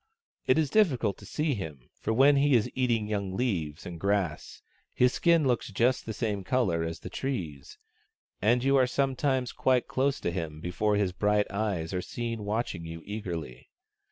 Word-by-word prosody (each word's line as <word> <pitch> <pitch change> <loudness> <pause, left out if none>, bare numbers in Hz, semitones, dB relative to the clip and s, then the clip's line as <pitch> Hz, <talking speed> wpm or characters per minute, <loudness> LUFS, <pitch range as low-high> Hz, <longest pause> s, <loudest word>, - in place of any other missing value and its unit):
It - - +4
is 155 -3 +1
difficult 130 - +2
to 100 - -12
see 150 +5 0
him, 75 - -7
for - - -2
when 135 +5 +5
he 140 -1 +4
is 115 - +2
eating 120 -4 +1
young 100 -3 -3
leaves 85 -10 -2
and 85 -2 -7
grass 100 -4 -1 0.3
his 125 0 +4
skin 170 -3 +3
looks 125 -3 0
just 120 +5 +1
the - - -2
same 105 -2 -2
colour 95 -7 +1
as 80 0 -5
the - - -7
trees, 85 - -4 0.6
and 120 +4 +3
you 135 +1 +3
are 130 -1 +4
sometimes 130 -1 0
quite 130 -2 +1
close 135 +1 0
to - - -1
him 80 -4 -4
before 105 +5 0
his 100 -3 +1
bright 105 +2 +2
eyes 100 -5 -2
are 90 - -1
seen 115 0 -4
watching 105 -4 -2
you 80 0 -8
eagerly. 85 - -6
105 Hz, 180 wpm, -28 LUFS, 90-130 Hz, 0.6 s, when